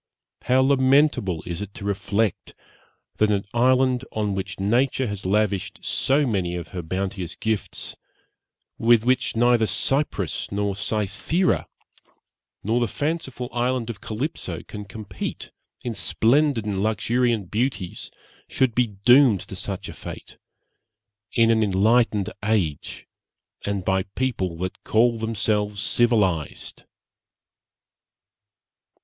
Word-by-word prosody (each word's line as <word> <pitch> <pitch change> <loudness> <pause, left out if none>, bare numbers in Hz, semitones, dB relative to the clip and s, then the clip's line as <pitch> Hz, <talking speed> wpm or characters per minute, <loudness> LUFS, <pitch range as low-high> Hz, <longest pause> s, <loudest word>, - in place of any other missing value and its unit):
how 130 +1 +4
lamentable 130 - +3
is 85 +2 -5
it 100 -1 -7
to 100 - -8
reflect, 100 +1 -1 0.6
that 110 - +3
an 100 -1 0
island 130 +1 +3
on 105 -2 -1
which 95 0 -4
Nature 125 +6 +1
has 100 -4 -4
lavished 100 -1 0
so 140 +2 +2
many 95 -7 -1
of 85 -2 -6
her 90 - -5
bounteous 90 +1 -4
gifts, 110 -1 -3 0.8
with 115 -1 +4
which 130 -1 +1
neither 120 -1 +4
Cyprus 105 - -1
nor 100 -1 -1
Cythera, 110 - 0 1.0
nor 115 +4 +1
the 120 - +1
fanciful 145 -2 -3
island 120 -1 0
of 100 -4 -12
Calypso, 110 - -4
can 105 -1 -8
compete 100 -2 -6 0.3
in 120 - -3
splendid 125 +2 +2
and 100 -2 -1
luxuriant 110 -1 0
beauties, 110 -6 -2 0.4
should 130 -3 +1
be 125 +1 +2
doomed 110 - +5
to - - -9
such - - -5
a - - -7
fate, - - -9 1.0
in 115 -1 +4
an 110 -1 +3
enlightened 105 +1 +2
age, 100 -9 -1 0.6
and 100 -2 -2
by 95 0 +2
a - - -2
people 95 -10 -1
that 90 +2 -5
call 115 +2 +3
themselves 105 -2 -1
civilized! 95 -9 0
110 Hz, 120 wpm, -24 LUFS, 100-125 Hz, 1.0 s, doomed